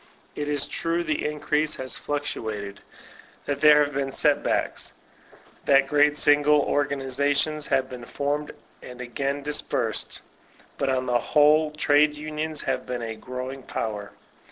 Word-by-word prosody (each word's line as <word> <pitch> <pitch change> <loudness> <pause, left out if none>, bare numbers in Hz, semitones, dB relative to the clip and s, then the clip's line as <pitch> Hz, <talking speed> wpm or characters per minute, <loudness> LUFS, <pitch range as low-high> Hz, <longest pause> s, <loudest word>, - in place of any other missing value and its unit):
It 150 0 -4
is 145 -1 +2
true 170 +1 -2
the 155 -2 -1
increase 150 0 -1
has 130 -1 -4
fluctuated; 110 -9 -4 0.7
that 140 0 -3
there 150 -1 +7
have 145 - -7
been 135 0 -2
set 145 +2 +2
backs; - - -1 0.7
that 135 -1 +5
great 150 0 +3
single 145 0 +4
organiza 140 0 0
tions 155 0 0
have 130 -1 +1
been 125 -2 -9
formed 145 +4 -3 0.3
and 125 0 -11
again 135 +3 -3
dispersed. 150 +1 0 0.6
But 135 - 0
on 130 -1 0
the 120 -1 +1
whole, 150 +2 +4
trade 150 0 +3
unions 155 0 -3
have - - -3
been 125 -1 -4
a 115 -1 -4
growing 130 +4 -7
power. 105 -4 -5
145 Hz, 145 wpm, -25 LUFS, 130-150 Hz, 0.7 s, there